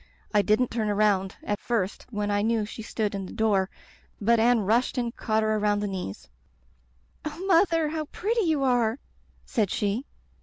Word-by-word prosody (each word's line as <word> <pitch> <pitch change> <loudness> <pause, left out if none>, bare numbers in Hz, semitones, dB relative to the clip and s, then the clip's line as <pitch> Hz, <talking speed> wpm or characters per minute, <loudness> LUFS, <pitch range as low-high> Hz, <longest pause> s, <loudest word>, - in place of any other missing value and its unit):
I 210 - +5
didn't 215 +5 +2
turn 220 -2 -1
around 200 -2 +2
at 205 - -2
first 210 -5 -2
when 210 -3 -2
I 205 0 +2
knew 220 0 +1
she 215 - -8
stood 215 -1 -2
in 195 -2 -4
the - - -9
door, 200 -4 +1 0.5
but 230 +2 +3
Anne 235 0 +4
rushed 230 +7 +1
and 240 -1 -1
caught 220 -1 0
her 215 0 +1
around 205 -1 +1
the 205 - -1
knees. 185 - -5 1.0
*Oh, 305 +5 -5
Mother, 335 -4 +3
how 310 0 -3
pretty 450 +9 -1
you 315 -7 +1
are!' 245 -3 +2 0.5
said 215 -5 0
she. 210 +9 -1
220 Hz, 180 wpm, -26 LUFS, 205-250 Hz, 1.0 s, I